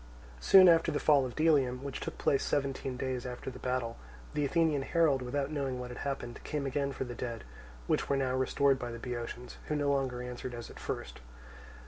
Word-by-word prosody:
Soon 190 - +8
after 165 -1 +5
the 145 - -1
fall 140 -4 +4
of 120 - -9
Delium, 140 -5 +2
which 140 -1 -4
took - - -6
place 135 - +2
seventeen 135 -2 -1
days 130 -1 -2
after 125 +1 -6
the - - -10
battle, 125 -2 -2 0.4
the 150 - 0
Athenian 155 0 +2
herald, 150 -2 +2
without 135 +3 -2
knowing 135 -4 -2
what 125 0 -6
had 125 - -7
happened, 135 -4 -4
came 150 -2 -3
again 140 +1 -1
for 135 - -3
the 125 -2 -6
dead, 120 -1 -5 0.4
which - - 0
were 140 - +2
now 130 -2 0
restored 130 +1 +2
by 125 - -4
the 115 - -6
Boeotians, 120 +1 -6
who 150 - -1
no 145 -1 +1
longer 130 -3 -1
answered 125 0 -6
as 120 -1 -8
at - - -12
first. - - -5
135 Hz, 205 wpm, -31 LUFS, 125-145 Hz, 0.4 s, Soon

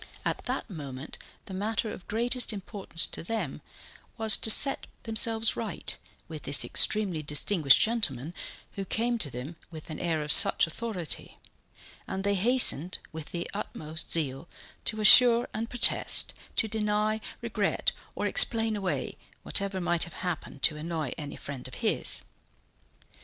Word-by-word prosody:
At - - -3
that - - -4
moment 145 - -9 0.3
the 190 - -9
matter 215 +3 -2
of 180 - -11
greatest 240 +3 +1
importance 195 -4 -4
to - - -7
them 225 +6 -4 0.6
was 220 -1 +4
to - - +3
set 275 +5 +4 0.2
themselves 225 0 +1
right - - -6 0.3
with - - -8
this - - +2
extremely 195 -7 +2
distinguished 150 0 +4
gentleman, 170 - -1 0.4
who 195 - -6
came 235 +4 -1
to 145 - +2
them 130 +7 -8
with 160 -1 -10
an 155 - -7
air 165 -3 -2
of 150 - -2
such 200 +2 +7
authority; 180 -1 -5 0.7
and 190 - -5
they 200 0 +1
hastened 200 - +3
with 160 -1 -9
the 175 0 -5
utmost 155 +2 -6
zeal 150 -1 0 0.4
to 215 -1 -3
assure 240 +2 +7
and 225 +1 -4
protest, 245 -2 +3 0.2
to 225 - +1
deny, 215 0 -1 0.2
regret - - -1 0.2
or - - -3
explain 225 -2 +4
away 195 -3 -4 0.2
whatever 195 -1 0
might 175 -1 +2
have 170 - -12
happened 160 -6 -6
to 155 +1 +3
annoy 155 -4 -4
any 145 -2 -8
friend 140 -3 -8
of 130 - -11
his. - - +2
190 Hz, 145 wpm, -27 LUFS, 155-220 Hz, 0.7 s, such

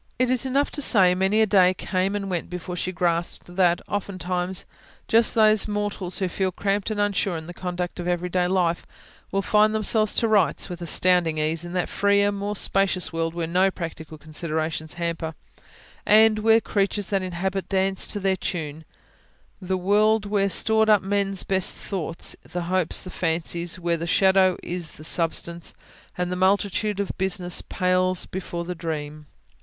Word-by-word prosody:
It 255 0 +1
is 255 +1 0
enough 275 +2 +1
to 290 - -2
say: 190 -9 +4
many 190 +4 +2
a - - +4
day 185 -2 +4
came 190 +2 -1
and 200 -1 -3
went 180 -3 -3
before 180 0 -6
she 180 +1 -2
grasped 175 0 -2
that, 175 -2 +3
oftentimes, 185 -2 -3 0.4
just 230 +1 +3
those 215 -2 +4
mortals 205 -3 -3
who 190 - 0
feel 185 +1 -1
cramped 200 +2 -1
and 215 -1 -3
unsure 200 -3 0
in 160 - -8
the 175 - -8
conduct 180 0 -4
of 175 - -4
everyday 180 0 0
life, 175 -2 0 0.4
will 195 0 0
find 215 +1 +3
themselves 215 0 +2
to 230 - +2
rights, 210 -2 +2
with 175 -1 -7
astounding 170 -1 +2
ease, 155 +2 0
in 175 0 -7
that 180 -1 0
freer, 200 0 +2
more 200 +1 -3
spacious 195 -3 0
world 165 0 -2
where 170 -1 -2
no 180 +4 +2
practical 160 -3 -7
considerations 155 0 -3
hamper, 165 -2 -3 0.7
and 215 0 +5
where 225 +1 +5
the - - 0
creatures 200 -1 -1
that 195 -2 +1
inhabit 185 +1 -3
dance 190 0 +1
to 205 - -2
their 190 -1 +1
tune: 160 -4 -5 0.8
the 185 0 -1
world 210 +3 +2
where 200 -1 +1
are - - 0
stored 220 +4 +4
up 210 -3 +5
men's 195 0 0
best 190 -1 +1
thoughts, 170 -4 -4
the 175 0 -5
hopes, 180 0 0
and 185 - -8
fancies; 170 +1 -2
where 170 -1 0
the 165 +1 -5
shadow 190 0 +4
is 175 -2 -4
the 155 - -13
substance, 170 +1 -1 0.4
and 180 0 -2
the - - -1
multitude 200 +2 +1
of 200 - -1
business 180 -2 -1
pales 185 0 0
before 175 -2 -5
the 180 - -4
dream. 155 -3 -6
185 Hz, 175 wpm, -24 LUFS, 175-200 Hz, 0.8 s, and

